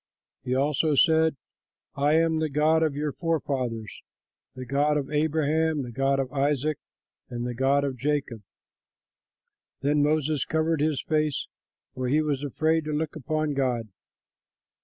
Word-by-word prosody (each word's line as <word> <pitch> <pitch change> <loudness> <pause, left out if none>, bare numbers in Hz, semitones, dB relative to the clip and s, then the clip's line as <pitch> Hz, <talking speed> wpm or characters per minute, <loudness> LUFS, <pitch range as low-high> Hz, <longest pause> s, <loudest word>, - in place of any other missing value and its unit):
He 125 - -1
also 150 +2 +1
said, 160 +1 +4 0.6
"I 145 +2 +2
am 160 0 +3
the 160 -1 0
God 155 +3 +3
of 155 -3 +1
your 150 0 -2
forefathers, 130 - -2 0.5
the 130 0 -7
God 145 +3 +1
of 140 -1 -3
Abraham, 155 0 +1
the 120 - -7
God 135 +3 +1
of 130 0 -3
Isaac, 145 +1 0 0.5
and 120 -1 -4
the 125 - -3
God 135 +3 +2
of 135 -2 -2
Jacob." 140 -4 -2 1.4
Then 145 +1 +2
Moses 150 -1 +1
covered 160 -1 0
his 150 -2 0
face; 155 -2 0 0.5
for 130 0 -3
he 150 +5 +2
was 145 -3 -1
afraid 160 +3 +1
to 155 - -3
look 150 +1 -2
upon 155 +1 -1
God. 125 -5 -1
145 Hz, 145 wpm, -26 LUFS, 135-155 Hz, 1.4 s, said